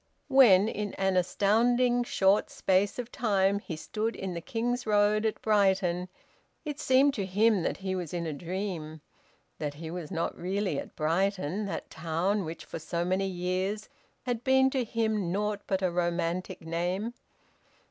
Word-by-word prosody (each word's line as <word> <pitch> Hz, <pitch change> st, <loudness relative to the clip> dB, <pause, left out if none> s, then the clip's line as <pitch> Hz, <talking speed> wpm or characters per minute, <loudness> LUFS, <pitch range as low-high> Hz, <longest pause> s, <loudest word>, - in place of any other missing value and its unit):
When, 225 Hz, -8 st, +7 dB
in 210 Hz, -2 st, -3 dB
an 190 Hz, -1 st, +1 dB
astounding 240 Hz, +7 st, +3 dB
short 200 Hz, -3 st, +2 dB
space 190 Hz, +1 st, +1 dB
of 245 Hz, -1 st, -5 dB
time, 200 Hz, -3 st, +2 dB
he 170 Hz, -, -6 dB
stood 215 Hz, +8 st, -3 dB
in 190 Hz, -2 st, -4 dB
the 170 Hz, -, -5 dB
King's 245 Hz, +2 st, -2 dB
Road 210 Hz, +1 st, +3 dB
at 215 Hz, -, -3 dB
Brighton, 190 Hz, -4 st, +2 dB, 0.6 s
it 295 Hz, -1 st, -4 dB
seemed 270 Hz, +1 st, +4 dB
to 200 Hz, -6 st, -2 dB
him 205 Hz, +1 st, +3 dB
that -, -, -1 dB
he 190 Hz, -1 st, -3 dB
was 180 Hz, -4 st, -4 dB
in 170 Hz, -1 st, -3 dB
a 160 Hz, -, -3 dB
dream; 170 Hz, -1 st, -5 dB, 0.6 s
that 145 Hz, -2 st, -3 dB
he 160 Hz, +1 st, -7 dB
was 170 Hz, -3 st, -6 dB
not 170 Hz, -3 st, -2 dB
really 190 Hz, -3 st, -1 dB
at -, -, -9 dB
Brighton, 185 Hz, +3 st, 0 dB
that -, -, -5 dB
town 170 Hz, +5 st, -1 dB
which 160 Hz, +1 st, -7 dB
for -, -, -6 dB
so 170 Hz, +2 st, -2 dB
many 190 Hz, +2 st, 0 dB
years 185 Hz, +3 st, -2 dB, 0.3 s
had 245 Hz, -2 st, -2 dB
been 265 Hz, 0 st, +4 dB
to 260 Hz, -2 st, 0 dB
him 220 Hz, -5 st, -1 dB
naught 205 Hz, +1 st, -1 dB
but 190 Hz, -1 st, 0 dB
a 185 Hz, -, +2 dB
romantic 175 Hz, 0 st, -1 dB
name. 180 Hz, +7 st, -2 dB
195 Hz, 165 wpm, -29 LUFS, 175-215 Hz, 0.6 s, When